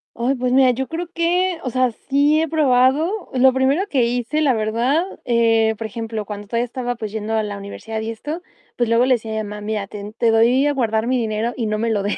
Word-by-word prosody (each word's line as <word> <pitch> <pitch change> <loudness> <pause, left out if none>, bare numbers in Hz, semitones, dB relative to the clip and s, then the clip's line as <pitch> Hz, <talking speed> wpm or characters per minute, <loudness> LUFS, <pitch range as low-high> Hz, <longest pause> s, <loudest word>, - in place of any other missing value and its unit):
Ay, 250 +4 0
pues 250 0 -1
mira, 260 0 +5
yo 260 +2 -3
creo 340 +2 -4
que 350 +1 +1
o 255 - -2
sea, 255 0 +1
sí 285 +6 +1
he 325 - 0
probado. 300 +6 +2
Lo 260 0 +5
primero 270 +8 +2
que 265 -10 +2
hice, 245 +5 -1
la 285 -4 +3
verdad, 235 +8 +1 0.2
eh, 225 -2 +3
por 225 - -5
ejemplo, 220 -1 -5
cuando 205 0 -7
todavía 235 +3 0
estaba 245 0 -4
pues 220 -3 -6
yendo 220 0 -4
a 220 - +1
la 205 -1 -5
universidad 220 +2 -6
y 220 - -4
esto, 295 +9 -6 0.4
pues 240 -2 +1
luego 230 +2 +4
le 260 -1 +4
decía 225 -1 -6
a - - -2
mi 205 - -7
mamá: 210 0 -7
"Mira, 210 -1 -3
te 205 +1 -8
te 230 -2 +3
doy 235 +5 +4
a 290 - +2
guardar 225 -4 0
mi 255 +1 +1
dinero 225 0 -1
y 235 - -2
no 215 0 -1
me 230 +2 -1
lo 210 -2 +1
des". 205 - -1
240 Hz, 245 wpm, -20 LUFS, 220-265 Hz, 0.4 s, mira